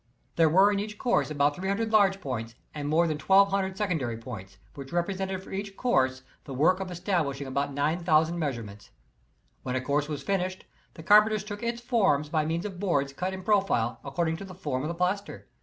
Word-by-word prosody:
There 165 -2 +4
were 190 +6 +5
in 200 - 0
each 210 +1 -5
course 240 -7 +1
about 145 -1 +1
300 200 +5 -2
large 195 -3 +4
points 115 -4 -4 0.2
and 145 -1 -4
more 165 +3 +3
than 155 -2 -2
1,200 195 +2 +3
secondary 160 - -1
points, 110 -5 -9 0.2
which 135 -1 -9
represented 190 +2 -2
for - - -13
each 195 0 -5
course, 130 - +1 0.2
the 135 - -7
work 175 +8 +3
of 190 -1 -4
establishing 170 -6 -1
about 140 +2 -2
9,000 160 +3 +1
measurements. 110 - -5 0.7
When 130 -1 -3
a - - +1
course 145 +2 0
was 145 -2 -4
finished 185 +1 -2 0.3
the 160 - -10
carpenters 210 +2 +5
took 205 0 -7
its 235 0 -2
forms 195 - +2
by 155 -1 +1
means 165 +4 -2
of 190 -4 -6
boards 140 -8 0
cut 180 +6 -2
in 190 0 -7
profile, 190 - +1
according 160 +3 -1
to 195 - -8
the 190 -2 -10
form 145 -8 -3
of 150 - -3
the 170 - -3
plaster. 185 +3 -2
170 Hz, 195 wpm, -28 LUFS, 140-195 Hz, 0.7 s, were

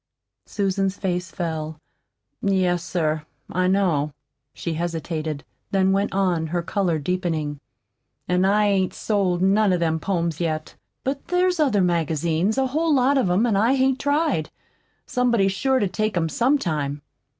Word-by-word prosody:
Susan's 195 -1 -1
face 180 -2 -2
fell. 160 -3 -4 0.6
"Yes, 185 -3 +1
sir, 155 -4 -1 0.3
I 185 +1 +1
know." 170 -7 +1 0.4
She 170 - -4
hesitated, 160 -2 -3 0.3
then 190 -1 +2
went 200 +1 +1
on, 180 -4 +1
her 170 +2 -2
color 180 -3 0
deepening. 155 -3 -2 0.7
"An' 180 +1 +2
I 205 +2 +3
hain't 190 -2 +1
sold 185 -4 0
none 200 +1 +4
o' - - +2
them 160 -2 0
poems 170 -4 -1
yet. 155 -2 -2 0.3
But 275 +1 -3
there's 360 0 +1
other 260 -10 +3
magazines, 170 - +1
a 270 - +3
whole 310 +4 +1
lot 265 +2 +3
of 195 - +1
'em, 180 +5 +3
that 235 -4 +2
I 225 +7 +3
hain't 265 0 +2
tried. 285 - +1 0.6
Somebody's 235 -6 +2
sure 265 +7 +1
to 210 -6 +1
take 215 +1 -1
'em 165 -1 +1
some 255 - +2
time." 150 - -2
185 Hz, 150 wpm, -23 LUFS, 165-215 Hz, 0.7 s, none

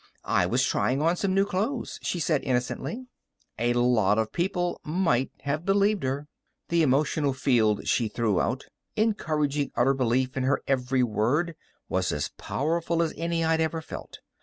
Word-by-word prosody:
"I - - +2
was - - +2
trying 130 +2 +1
on 165 +3 +2
some 190 +1 0
new 195 0 +4
clothes," 210 +7 -2
she 175 - -2
said 155 -2 +1
innocently. 130 - -2 0.5
A 120 +1 +2
lot 120 -4 +3
of 110 -1 0
people 175 0 -1
might 155 -6 +1
have 145 +3 -2
believed 200 +1 +2
her. 135 +3 -2 0.4
The 170 0 +3
emotional 145 0 +2
field 115 -6 +2
she 115 - +2
threw 105 -4 0
out, 125 +3 -2 0.3
encouraging 155 -10 0
utter 130 +3 +3
belief 130 0 0
in 135 - -1
her 130 +2 +1
every 130 -1 +1
word, 125 - +1 0.3
was 95 0 0
as 75 - -2
powerful 165 +3 -1
as 160 - -2
any 165 +1 -1
I'd 160 0 +2
ever 160 0 0
felt. 160 - -9
145 Hz, 160 wpm, -27 LUFS, 125-170 Hz, 0.5 s, new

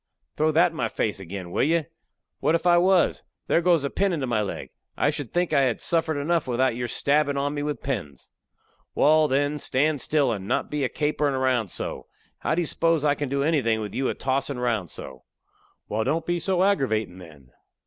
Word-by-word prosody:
"Throw 155 +1 +2
that 170 +2 +4
in - - -13
my - - 0
face 105 -2 -2
agin, 95 -1 -7
will - - 0
you? 165 +1 +2 0.5
What 150 +4 +2
if 170 +1 -2
I 175 -1 +6
was? 185 0 +3 0.2
There 170 - +2
goes 170 -4 +3
a 140 - -1
pin 195 -2 +1
into 145 -5 -1
my 115 -4 0
leg! 105 - -5 0.3
I 145 - +2
should 145 -5 -5
think 175 0 0
I 140 - +4
had 130 -4 +1
suffered 160 -2 0
enough 165 +1 0
without 125 0 +1
your 120 0 -3
stabbin' 145 +2 +1
of 140 +1 -1
me 145 - -3
with 150 0 -4
pins." 95 - -5 0.6
"Wal, 155 +1 +4
then, 145 +2 0
stand 145 +1 +1
still, 145 -5 +2
and 100 -3 -4
not - - -1
be 150 -1 -1
a 130 - +1
caperin' 150 -2 0
round 130 -6 +1
so. - - -5 0.3
How - - 0
do 175 - +1
you - - -3
s'pose 165 -1 +1
I 145 - +4
can 145 -1 -4
do 140 +1 0
anything 135 -8 +1
with 105 -2 -5
you 135 0 0
a - - -2
tossin' 135 0 -1
round 115 -8 -1
so?" 65 -1 -9 0.7
"Wal, 110 +1 -1
don't 160 +7 -1
be 175 0 0
so 185 +2 +1
aggravatin', 110 - 0
then." 75 -8 -15
145 Hz, 215 wpm, -25 LUFS, 120-160 Hz, 0.7 s, I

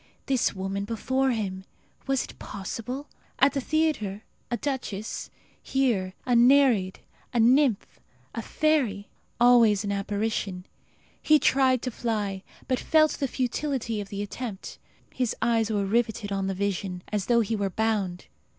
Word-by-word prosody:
This 260 -6 +1
woman 195 +1 -3
before 260 +5 0
him! 195 -6 -2 0.4
Was 270 -1 +1
it - - -12
possible? 230 +8 -6 0.3
At 275 +2 +4
the 275 - -1
theatre 260 -10 0 0.3
a 240 - -1
duchess; 230 -6 -4 0.3
here 220 -9 0
a 245 - +2
nereid, 240 -6 +4 0.3
a - - +3
nymph, 245 -1 +3 0.3
a 230 - -3
fairy. 250 -8 0 0.3
Always 235 -4 +5
an 200 - -2
apparition. 200 -2 -2 0.6
He 310 - +5
tried 260 -3 +3
to 255 - -2
fly, 210 -5 -2 0.3
but 255 -1 0
felt 310 -1 +4
the 275 - -2
futility 250 -3 -2
of 200 - -8
the 200 0 -4
attempt. 205 -1 -7 0.3
His 250 -3 -1
eyes 225 -1 +1
were 205 -2 0
riveted 220 -1 0
on 195 -1 -1
the 195 - -2
vision, 190 -2 -2
as 205 -3 -1
though 235 -1 +4
he 225 +1 -1
were 200 -2 -1
bound. 200 -4 -1
225 Hz, 145 wpm, -26 LUFS, 200-260 Hz, 0.6 s, Always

